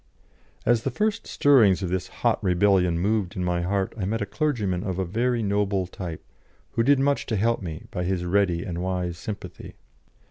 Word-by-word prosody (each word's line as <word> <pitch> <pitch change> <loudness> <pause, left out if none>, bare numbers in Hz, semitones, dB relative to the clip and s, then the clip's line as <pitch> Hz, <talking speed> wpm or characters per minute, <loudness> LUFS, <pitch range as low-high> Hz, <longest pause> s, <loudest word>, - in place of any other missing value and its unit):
As 120 -1 +3
the 135 - -1
first 215 - -1
stirrings 110 -10 +4
of 90 - -2
this 95 0 -2
hot 115 +3 -1
rebellion 90 -2 +3
moved 100 0 0
in 90 - -2
my 90 -1 0
heart 95 +2 -1
I 100 -5 -3
met 110 +4 -1
a 105 - -1
clergyman 105 - -1
of 95 -2 -3
a 95 - 0
very 115 +5 0
noble 100 -2 0
type, 90 -2 -7 0.5
who 115 - 0
did 140 +4 +4
much 140 +1 +1
to 110 - -1
help 115 +3 +1
me 85 -3 -6
by 90 -2 -2
his 90 -1 -1
ready 90 -2 +1
and 85 -3 -4
wise 90 -2 -2
sympathy. 95 -5 -7
95 Hz, 190 wpm, -25 LUFS, 90-115 Hz, 0.5 s, stirrings